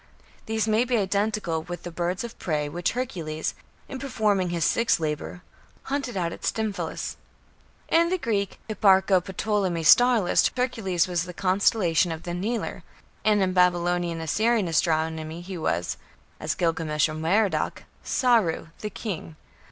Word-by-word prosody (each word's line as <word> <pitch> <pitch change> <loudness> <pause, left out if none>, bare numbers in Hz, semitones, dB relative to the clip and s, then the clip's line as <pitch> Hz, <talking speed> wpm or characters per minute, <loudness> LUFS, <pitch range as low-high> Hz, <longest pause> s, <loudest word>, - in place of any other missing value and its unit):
These 220 -1 0
may 220 +2 +3
be 250 -1 +1
identical 200 -4 0
with 175 +2 -7
the 175 - -6
birds 175 +4 -2
of 235 - -8
prey 150 -3 -1
which 170 +4 -2
Hercules, 170 -11 -3 0.3
in 265 - -6
performing 210 -8 0
his 170 -2 0
sixth 230 -5 +2
labour, 155 +3 -4 0.4
hunted 270 -5 -3
out 170 -2 -1
of - - -10
Stymphalus. 220 -2 -2 0.7
In 335 +1 +3
the 370 - +1
Greek 205 - -2
Hipparcho 190 -3 +4 0.2
Ptolemy 190 -6 0
star 245 +8 +6
list 180 -4 +2
Hercules 200 -8 0
was 175 -1 -1
the 180 -1 -9
constellation 185 -2 +2
of 160 0 -6
the 175 - -4
"Kneeler", 215 +7 -3 0.4
and 210 -2 +3
in 185 -1 0
Babylonian 175 -2 +2
Assyrian 215 +6 +1
astronomy 160 0 0
he 185 +2 -7
was 90 - -1 0.4
(as - - -2
Gilgamesh 160 -3 +1
or 155 - -5
Merodach) 185 +7 0 0.2
"Sarru", 225 - +2
"the 210 - -4
king". 180 -8 -6
185 Hz, 145 wpm, -25 LUFS, 165-220 Hz, 0.7 s, star